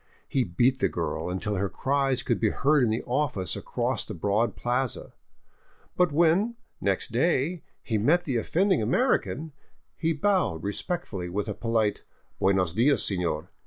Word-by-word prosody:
He 135 - +1
beat 120 +7 +1
the - - +2
girl - - -3
until 100 +3 -2
her 100 +1 0
cries 135 +1 0
could - - 0
be 110 - +2
heard 145 +4 +2
in 120 - +2
the 110 +2 -1
office 125 - -1
across - - -2
the - - -7
broad 105 +7 0
plaza. 125 0 -2 0.8
But 180 -2 +3
when, 170 +9 +3 0.3
next 100 -1 -1
day, 155 +6 +1 0.2
he 110 -4 -1
met 165 +11 +3
the 135 -7 -1
offending 185 - +2
American, 155 - 0 0.4
he 165 -1 0
bowed 160 - +1
respectfully 100 - -3
with 100 +3 -2
a - - -2
polite, 115 -3 0 0.2
" - - -41
Buenos 95 -4 +2
dias, 125 +8 +3
senor. 90 -3 -2
120 Hz, 160 wpm, -27 LUFS, 100-155 Hz, 0.8 s, But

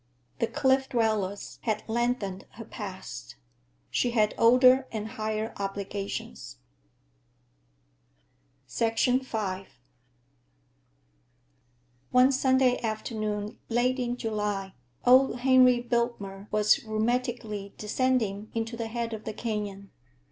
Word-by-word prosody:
The 230 - +1
Cliff 265 +3 +2
Dwellers 215 -5 -1
had 215 -2 -1
lengthened 225 -4 -1
her 225 +1 -9
past. 190 - -8 0.6
She 245 - +1
had 215 -3 +2
older 255 +3 +6
and 220 -1 -4
higher 220 -1 -3
obligations. 195 - -5 2.1
V 245 +3 +1 2.9
One 255 +2 +5
Sunday 260 -1 +3
afternoon 215 -1 -3
late 250 +2 +1
in 245 0 -2
July 210 -4 -2 0.3
old 255 0 +5
Henry 255 -1 +6
Biltmer 235 -5 -2
was 210 +2 +4
rheumatically 220 -2 -2
descending 215 -3 0
into 225 +1 -2
the 230 -1 -4
head 230 0 -3
of 215 -1 -7
the 220 - -4
canyon. 205 -3 -4
225 Hz, 95 wpm, -28 LUFS, 210-245 Hz, 2.9 s, older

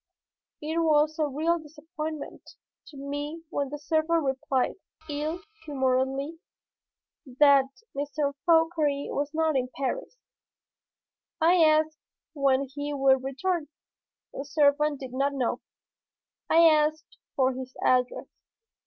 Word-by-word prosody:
It 320 +2 -1
was 310 -1 +2
a 305 - +2
real 320 +5 0
disappointment 310 0 -8 0.3
to 290 - -13
me 290 +4 -5
when 280 -1 -1
the 295 - -5
servant 315 +2 +1
replied, 265 -1 0 0.3
ill 305 +3 -3 0.2
humoredly, 270 +1 -1 0.9
that 275 +1 +5 0.3
M. 285 +1 -2 0.4
Fauchery 325 -4 +2
was 290 +1 -2
not 320 -1 +1
in 255 -1 0
Paris. - - -3 1.2
I 340 +1 +5
asked 310 0 +3 0.3
when 275 -2 +2
he 290 0 -4
would 265 -1 +3
return. 295 +5 -2 0.7
The 275 - -5
servant 290 0 +2
did 260 -2 -7
not 275 +2 0
know. 255 -3 -1 0.9
I 335 +1 +6
asked 310 0 +1 0.2
for 260 -1 +2
his 255 0 -8
address. 250 -1 +2
295 Hz, 115 wpm, -27 LUFS, 275-315 Hz, 1.2 s, I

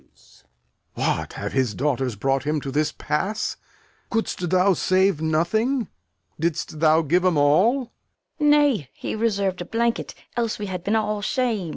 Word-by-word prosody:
Lear. - - -32 0.9
What, - - -1
have - - -5
his 130 -6 0
daughters 130 -4 -1
brought 135 +5 0
him 150 +2 0
to 135 - -5
this 150 +2 +1
pass? 200 +8 -2 0.5
Couldst 220 -6 -2
thou 185 +2 +4
save 185 -1 +2
nothing? 215 - +1 0.5
Didst 160 -1 -2
thou 160 +1 +4
give 175 +5 +2
'em 180 -4 +2
all? 215 - +3 0.5
Fool. 300 - +2
Nay, 285 - +3
he - - -5
reserv'd 200 -5 0
a - - -4
blanket, 235 +2 -1 0.2
else 230 -2 -1
we 210 - -4
had 185 -3 -5
been 210 +4 +1
all 210 -1 0
sham'd. 220 -5 -1
185 Hz, 160 wpm, -23 LUFS, 155-220 Hz, 0.9 s, thou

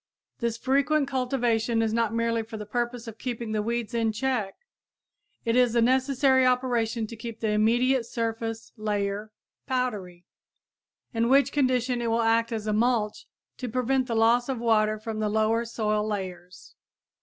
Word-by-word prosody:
This 235 -1 -1
frequent 275 +3 +2
cultivation 240 -4 0
is 220 -1 0
not 230 -2 +1
merely 230 0 0
for 220 0 -8
the 210 - -6
purpose 240 +2 -3
of 225 -1 -9
keeping 235 -3 -4
the 215 -1 0
weeds 235 +1 -2
in 230 -1 +1
check; 220 -3 -1 0.9
it 230 0 +1
is 245 -2 +3
a - - +4
necessary 260 +2 +3
operation 245 -3 +1
to 230 - -8
keep 230 0 -7
the 220 - -1
immediate 235 +4 +2
surface 225 -1 -3
layer 210 0 -2 0.4
powdery, 210 -10 -3 0.9
in 230 0 +1
which 275 +1 +4
condition 255 -3 +1
it 235 - -1
will 230 +1 +1
act 230 +1 +2
as 220 -2 -3
a 215 - 0
mulch 220 -1 0 0.3
to 250 - -5
prevent 255 +2 0
the 230 - -2
loss 235 +3 +3
of 265 - -1
water 215 -2 +2
from 215 0 -5
the 215 -1 0
lower 220 +2 +1
soil 215 -2 -1
layers. 185 -3 -6
230 Hz, 165 wpm, -26 LUFS, 215-250 Hz, 0.9 s, a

